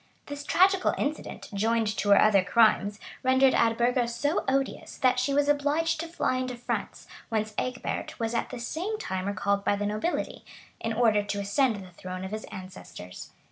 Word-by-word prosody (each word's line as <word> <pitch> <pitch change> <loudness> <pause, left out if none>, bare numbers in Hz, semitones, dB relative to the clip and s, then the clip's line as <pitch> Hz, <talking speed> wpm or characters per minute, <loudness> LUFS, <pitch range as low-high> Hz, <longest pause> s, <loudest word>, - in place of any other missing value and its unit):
[] - - -38
This 285 0 -7
tragical 375 +5 +3
incident, 300 +2 -4
joined 225 +3 +1
to 205 - -1
her 200 - +7
other 200 -3 +5
crimes, 210 -1 +3 0.2
rendered 260 0 +4
Eadburga 235 +1 +2
so 285 +6 0
odious, 270 0 -1
that 255 -1 +3
she 255 +3 0
was 285 +1 +2
obliged 295 +3 +1
to 335 - -3
fly 330 -6 -1
into 255 -1 -3
France; 240 - -4 0.2
whence 215 -2 -1
Egbert 250 +2 -3
was 225 0 -1
at 235 - -1
the 250 - -6
same 350 - -3
time 190 - -3
recalled 200 0 0
by 205 - +2
the 205 0 -2
nobility, 215 +12 -2 0.4
in 225 - -2
order 220 -2 +3
to 205 0 -3
ascend 225 +4 +2
the 180 - -14
throne 185 +1 -7
of 190 - -7
his 215 0 -5
ancestors. 185 - -10
235 Hz, 180 wpm, -27 LUFS, 205-275 Hz, 0.4 s, her